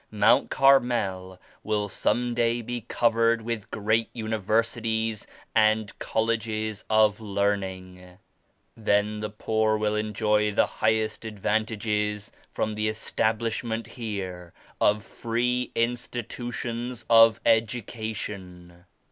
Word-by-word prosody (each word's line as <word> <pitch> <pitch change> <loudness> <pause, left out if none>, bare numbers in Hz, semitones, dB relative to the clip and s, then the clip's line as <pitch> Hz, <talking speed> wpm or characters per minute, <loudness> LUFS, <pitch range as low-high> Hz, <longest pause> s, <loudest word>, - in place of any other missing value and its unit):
Mount 110 +5 +3
Carmel 110 -9 +2 0.2
will 105 -1 0
some 120 +5 0
day 120 0 +1
be 120 +1 -4
covered 115 0 +2
with 115 -2 -4
great 110 +2 0
universities 110 0 -1 0.3
and 110 -1 +2
colleges 110 -1 -1
of 110 -1 +4
learning. 95 -3 -3 0.6
Then 105 -1 +1
the 105 0 -3
poor 110 0 0
will 105 0 0
enjoy 105 0 +1
the - - +4
highest 110 0 0
advantages 105 -1 -1 0.2
from 110 - -2
the 105 0 -1
establishment 115 +1 -1
here 95 -7 -6 0.3
of 105 0 +3
free 125 +2 -1
institutions 120 0 -3
of 115 -1 +7
education." 105 -6 -2
110 Hz, 95 wpm, -26 LUFS, 105-115 Hz, 0.6 s, of